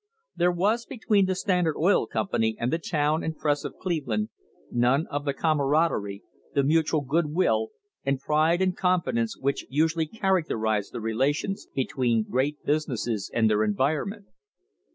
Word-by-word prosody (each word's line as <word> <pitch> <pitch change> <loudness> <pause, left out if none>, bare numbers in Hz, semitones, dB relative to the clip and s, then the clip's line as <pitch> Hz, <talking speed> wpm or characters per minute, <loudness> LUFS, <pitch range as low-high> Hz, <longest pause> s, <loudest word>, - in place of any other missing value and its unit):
There 175 +1 +3
was 210 +7 0
between 210 -5 +1
the 185 - 0
Standard 180 -4 +1
Oil 180 +6 +3
Company 115 - -1
and 120 +5 -1
the 165 - +1
town 155 -1 0
and 160 -1 -3
press 145 -2 0
of - - -6
Cleve 165 -7 -2
land 105 -2 -1 0.4
none 125 +6 +2
of 145 0 -3
the 140 - 0
camaraderie, 145 -10 +1 0.3
the 140 - +3
mutual 155 +1 +2
good 150 +4 0
will 115 -9 +1 0.3
and 140 -1 0
pride 155 +5 +2
and 185 -1 +1
confidence 170 -11 0
which 140 +1 -2
usually 160 +3 +1
characterise 150 - 0
the - - -6
relations 135 - -1
between 125 -4 +1
great 140 +4 -1
businesses 120 -8 -1
and 115 -1 +2
their 105 0 +2
environment. 150 - -1
150 Hz, 155 wpm, -26 LUFS, 120-170 Hz, 0.4 s, There